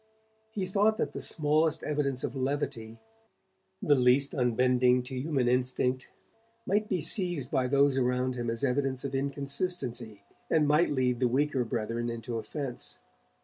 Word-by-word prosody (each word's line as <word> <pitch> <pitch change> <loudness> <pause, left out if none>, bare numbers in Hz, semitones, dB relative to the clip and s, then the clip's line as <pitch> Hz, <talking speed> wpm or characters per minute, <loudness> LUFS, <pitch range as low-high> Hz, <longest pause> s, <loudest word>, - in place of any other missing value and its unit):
He 205 -4 -3
thought 205 +4 +2
that - - -1
the - - -6
smallest 155 0 +1
evidence 140 -3 -1
of - - -3
levity, 130 -4 -3 0.9
the 145 - +4
least 130 +1 +3
unbending 125 0 +2
to 125 - -10
human 130 -1 -1
instinct, 125 +1 0 0.6
might 210 +2 0
be 185 -4 0
seized 170 - +2
by 130 -3 +1
those 140 0 +3
around 125 0 0
him 120 -2 -3
as 115 +2 -3
evidence 135 0 0
of 140 -1 -4
inconsistency, 135 - -2 0.3
and 155 -2 +3
might 150 +4 +3
lead 125 -3 0
the 125 - +2
weaker 135 +1 0
brethren 115 0 -3
into 115 0 -4
offence. 125 +3 -4
130 Hz, 145 wpm, -29 LUFS, 125-150 Hz, 0.9 s, the